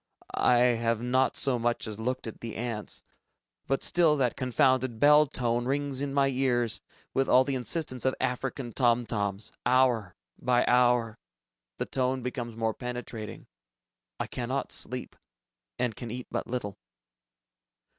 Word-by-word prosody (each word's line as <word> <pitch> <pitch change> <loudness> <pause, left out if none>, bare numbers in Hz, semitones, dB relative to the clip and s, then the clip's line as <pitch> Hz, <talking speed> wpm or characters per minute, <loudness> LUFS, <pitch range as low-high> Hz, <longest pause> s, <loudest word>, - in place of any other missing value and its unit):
I 125 - +3
have 115 -2 +2
not 130 +2 +1
so 130 -3 +1
much 120 +1 0
as 110 -1 -6
looked 125 +3 -2
at 110 - -7
the 115 -2 -6
ants, 105 - -4 0.6
but 135 - 0
still 165 -4 +4
that 125 -3 +1
confounded 130 -2 +1
bell 150 +2 +6
tone 120 -2 -1
rings 140 0 -1
in 140 -1 -2
my 140 0 +3
ears 125 -3 +1 0.3
with 135 0 +1
all 130 - +6
the 140 +1 -2
insistence 130 0 0
of 130 - +1
African 125 0 -2
tom 120 -2 +2
toms. 100 -2 -2
Hour 120 -7 +2 0.2
by 125 -1 +2
hour... 120 -2 +3 0.6
the - - -2
tone 130 -1 -1
becomes 120 -2 -4
more 115 -1 0
penetrating. 125 -3 -6 0.7
I - - -1
cannot 130 +2 -3
sleep, 125 0 -2 0.6
and 120 -4 -1
can 120 - -6
eat 125 +2 -5
but - - -3
little. 115 -5 -4
125 Hz, 145 wpm, -28 LUFS, 115-130 Hz, 0.7 s, bell